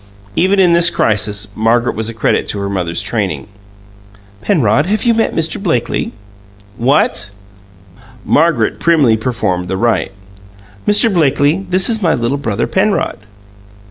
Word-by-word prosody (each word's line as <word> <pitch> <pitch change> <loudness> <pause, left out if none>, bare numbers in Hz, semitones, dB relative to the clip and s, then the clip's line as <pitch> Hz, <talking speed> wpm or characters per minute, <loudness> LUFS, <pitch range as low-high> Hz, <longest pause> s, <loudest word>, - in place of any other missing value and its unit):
Even 190 +3 +2
in 180 -3 +4
this 170 +1 +5
crisis, 105 - 0
Margaret 115 +2 +1
was 110 +1 -3
a - - -6
credit 110 - 0
to - - -3
her 100 0 -3
mother's 90 -3 -2
training. - - -2 1.0
"Penrod, 145 - +1
have 215 +2 -1
you 235 - +3
met 225 0 0
Mr. 165 +3 -1
Blakely?" 125 - -1 0.6
"What?" 120 -5 +1 1.0
Margaret 150 -8 +1
primly 150 -9 +3
performed 105 -6 -2
the 95 - -3
rite. 115 -2 0 0.8
"Mr. 210 +1 +3
Blakely, 155 +3 +1
this 185 +1 +2
is 225 -2 -1
my 165 -4 +2
little 120 +4 -2
brother 115 -5 -2
Penrod." 205 +2 0
135 Hz, 140 wpm, -14 LUFS, 110-180 Hz, 1.0 s, this